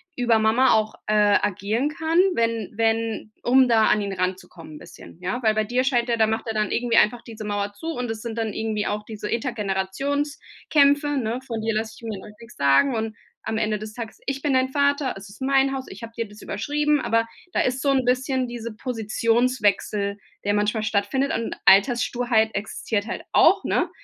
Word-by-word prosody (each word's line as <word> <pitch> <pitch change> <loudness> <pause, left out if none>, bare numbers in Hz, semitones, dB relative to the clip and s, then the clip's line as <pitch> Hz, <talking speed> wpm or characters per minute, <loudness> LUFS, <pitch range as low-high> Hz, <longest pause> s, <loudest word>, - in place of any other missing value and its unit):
über 240 -4 +2
Mama 230 +4 +4
auch, 215 0 +1
äh, 215 - +1 0.3
agieren 210 +7 -1
kann, 320 +2 0 0.2
wenn 230 -3 -1
wenn 225 -1 0
um 260 +1 +5
da 225 -2 +4
an 210 - +3
ihn 200 -1 -3
ranzukommen 180 -4 -5
bisschen, - - -14
ja? 185 +7 -2
Weil 220 -1 +4
bei 215 - +2
dir 245 +4 0
scheint 245 -3 +1
der 235 - +1
da 220 - +4
macht 220 +1 -2
er 225 - -2
dann 210 -2 0
irgendwie 240 -1 +1
einfach 230 +2 +4
diese 225 -2 -9
Mauer 205 0 -2
zu 320 +11 -9
und 250 -7 -3
das 225 -1 -4
sind 230 -1 -5
dann 220 -2 -2
irgendwie 215 -1 -2
auch 210 +1 -2
diese 210 -1 -6
Elterngenerationskämpe, 280 +6 0
ne? 235 -1 -1
„Von 230 -3 -4
dir 225 0 -1
lasse 220 0 -2
ich - - -20
mir 220 -4 -5
doch 210 +2 -12
nix 235 +1 -14
sagen.“ 140 - +3
Und 220 0 -3 0.3
am 220 - -2
Ende 215 -1 0
des 215 0 -8
Tages: 230 -1 -7
„Ich 275 0 -2
bin 290 -2 +1
dein 260 0 +2
Vater, 280 -1 +1
es 195 0 -11
ist 200 - -15
mein 270 0 +2
Haus, 260 -1 -5
ich 195 +4 -10
habe 230 0 -8
dir 230 -1 -3
das 210 +1 -14
überschrieben.“ 295 +7 0
Aber 230 -1 +1 0.3
da - - +2
ist 255 +1 0
so 285 - +1
'n 265 -2 +1
bisschen 255 0 +1
diese 235 -2 -6
Positionswechsel, 220 -3 0 0.3
der 205 - +1
manchmal 210 +1 0
stattfindet, 215 +7 0
und 230 - -2
Alterssturheit 235 +1 +3
existiert 205 +1 -3
halt 235 - -5
auch, - - +5
ne? - - +1
225 Hz, 200 wpm, -23 LUFS, 210-255 Hz, 0.3 s, um